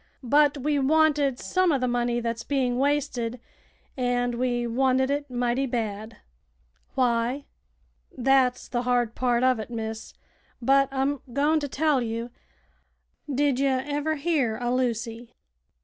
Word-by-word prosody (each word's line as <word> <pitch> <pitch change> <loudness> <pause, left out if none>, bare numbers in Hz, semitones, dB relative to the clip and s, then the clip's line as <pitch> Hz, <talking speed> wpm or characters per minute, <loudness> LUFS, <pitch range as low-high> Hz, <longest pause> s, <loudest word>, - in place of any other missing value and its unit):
But 290 +3 +3
we 290 +1 0
wanted 290 -2 +3
some 370 +5 +1
uv 285 -4 +2
th' 255 - 0
money 240 0 0
that's 230 -1 -3
being 255 -3 0
wasted, 270 -4 -1 0.6
an' 245 -1 -1
we 245 -1 0
wanted 260 +2 +1
it 285 0 -2
mighty 245 +2 0
bad." 220 -2 -4 0.8
"Why?" 245 +2 +1 0.7
"Thet's 255 -1 +2
the 240 - -2
hard 245 -2 +1
part 245 -1 +1
uv 255 -2 +3
it, 220 - -6
miss; 220 -1 -6 0.4
but 275 +2 +3
I'm 270 +1 -1
goin' 295 +4 +2
to 290 - -3
tell 290 -1 +1
you. 230 +1 -4 1.0
Did 275 -1 +1
ye 275 - +2
ever 285 +4 -1
hear 280 -7 0
o' 245 0 -1
Lucy?" 235 -2 -2
255 Hz, 135 wpm, -26 LUFS, 240-280 Hz, 1.0 s, But